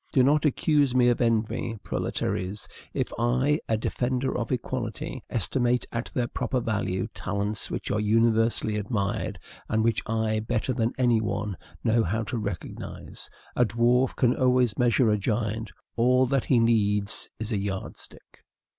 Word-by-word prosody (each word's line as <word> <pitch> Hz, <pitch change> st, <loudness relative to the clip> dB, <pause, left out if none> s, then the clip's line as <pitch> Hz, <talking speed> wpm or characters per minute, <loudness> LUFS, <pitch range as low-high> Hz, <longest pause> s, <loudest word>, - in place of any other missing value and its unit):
Do 130 Hz, -, +4 dB
not 145 Hz, +3 st, +3 dB
accuse 145 Hz, -2 st, +2 dB
me 125 Hz, -1 st, +5 dB
of 120 Hz, -, +1 dB
envy, 115 Hz, 0 st, 0 dB
proletaires, 95 Hz, +3 st, -2 dB, 0.2 s
if -, -, -2 dB
I, 130 Hz, +6 st, +2 dB
a 110 Hz, -, +2 dB
defender 125 Hz, +3 st, -1 dB
of 120 Hz, -1 st, -2 dB
equality, 130 Hz, +3 st, -3 dB
estimate 120 Hz, +3 st, +1 dB
at 115 Hz, 0 st, -3 dB
their 125 Hz, -, +1 dB
proper 125 Hz, +2 st, -2 dB
value 105 Hz, -5 st, -1 dB
talents 100 Hz, +1 st, -2 dB
which -, -, -3 dB
are 105 Hz, -, +1 dB
universally 115 Hz, 0 st, +2 dB
admired, 105 Hz, -1 st, -2 dB, 0.3 s
and 110 Hz, 0 st, +2 dB
which 115 Hz, 0 st, +2 dB
I, 110 Hz, -1 st, 0 dB
better 110 Hz, +3 st, -1 dB
than 115 Hz, 0 st, 0 dB
any 120 Hz, -3 st, +3 dB
one, 105 Hz, -2 st, -2 dB, 0.3 s
know 115 Hz, 0 st, +3 dB
how 110 Hz, +6 st, -1 dB
to 120 Hz, +2 st, -3 dB
recognize. 100 Hz, -5 st, -6 dB, 0.3 s
A 125 Hz, -, +4 dB
dwarf 120 Hz, +2 st, +2 dB
can 125 Hz, -1 st, +3 dB
always 125 Hz, -4 st, +3 dB
measure 120 Hz, -1 st, +3 dB
a 105 Hz, -, +2 dB
giant: 110 Hz, +1 st, -1 dB, 0.2 s
all 125 Hz, +2 st, +4 dB
that 135 Hz, 0 st, 0 dB
he 130 Hz, -, +3 dB
needs 105 Hz, -3 st, +2 dB
is 110 Hz, +1 st, -5 dB
a 105 Hz, -, +1 dB
yardstick. 95 Hz, -1 st, -6 dB
115 Hz, 155 wpm, -26 LUFS, 110-125 Hz, 0.3 s, me